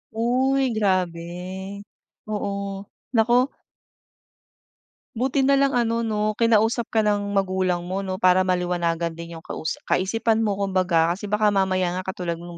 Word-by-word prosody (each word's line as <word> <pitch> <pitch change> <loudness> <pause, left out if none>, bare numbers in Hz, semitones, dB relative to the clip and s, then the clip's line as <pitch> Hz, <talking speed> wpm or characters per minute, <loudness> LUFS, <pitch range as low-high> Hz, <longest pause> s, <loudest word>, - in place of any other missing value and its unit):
Uy, 260 +3 +2
grabe. 185 0 -2 0.5
Oo. 200 -1 -3 0.3
Naku 245 +4 +3 1.7
Buti 265 +3 +1
na 275 - +4
lang, 275 -2 +3
ano, 230 -1 +1
'no 215 -1 0
kinausap 230 +1 +2
ka 220 -1 +1
ng 205 -1 0
magulang 185 -2 0
mo, 190 +2 -2
'no? 185 -1 -4
Para 185 0 +4
maliwanagan 175 -2 0
din 170 0 -8
yung 160 - -14
kausa 160 - -4
kaisipan 225 +4 +1
mo 205 -3 0
kumbaga. 185 -4 +2
Kasi 200 +2 -7
baka 210 0 +2
mamaya 185 -2 +1
nga 185 - -2
katulad 175 -2 -3
noong 175 -1 -9
195 Hz, 140 wpm, -23 LUFS, 180-225 Hz, 1.7 s, na